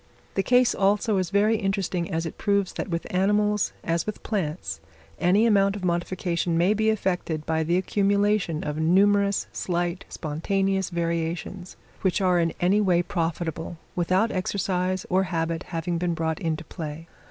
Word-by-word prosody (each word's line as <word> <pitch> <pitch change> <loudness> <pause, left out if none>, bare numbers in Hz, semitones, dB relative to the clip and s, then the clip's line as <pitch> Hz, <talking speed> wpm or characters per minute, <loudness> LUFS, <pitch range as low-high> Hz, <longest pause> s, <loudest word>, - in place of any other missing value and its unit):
The 195 - +1
case, 250 +3 +4
also, 205 +2 +2
is 185 -2 0
very 210 +3 +3
interesting, 195 -4 -1
as 165 +1 -1
it 165 - -7
proves 200 -2 +1
that - - -4
with 170 -1 -2
animals, 210 +2 +2
as 165 +2 -1
with 215 - -5
plants, 155 - -3 0.4
any 195 +6 +4
amount 200 -3 +3
of 195 -3 -4
modification 175 -1 -1
may 180 +5 +4
be 220 +1 +1
effected 180 -7 -1
by 160 0 0
the 170 +3 +1
accumulation 200 -3 +1
of 150 0 -3
numerous, 200 +4 +3
slight, 175 0 -2
spontaneous 190 +5 -1
variations, 170 +2 -3 0.2
which 190 0 +1
are 180 -2 +3
in 165 -1 +1
any 195 +4 +3
way 180 -3 +3
profitable, 165 -1 -3 0.2
without 185 +6 +2
exercise 185 -1 -1
or 190 +1 +2
habit 165 -1 -1
having 170 0 -2
been 175 -1 0
brought 160 -1 -1
into 160 -1 -2
play. 160 0 -7
180 Hz, 155 wpm, -25 LUFS, 165-200 Hz, 0.4 s, case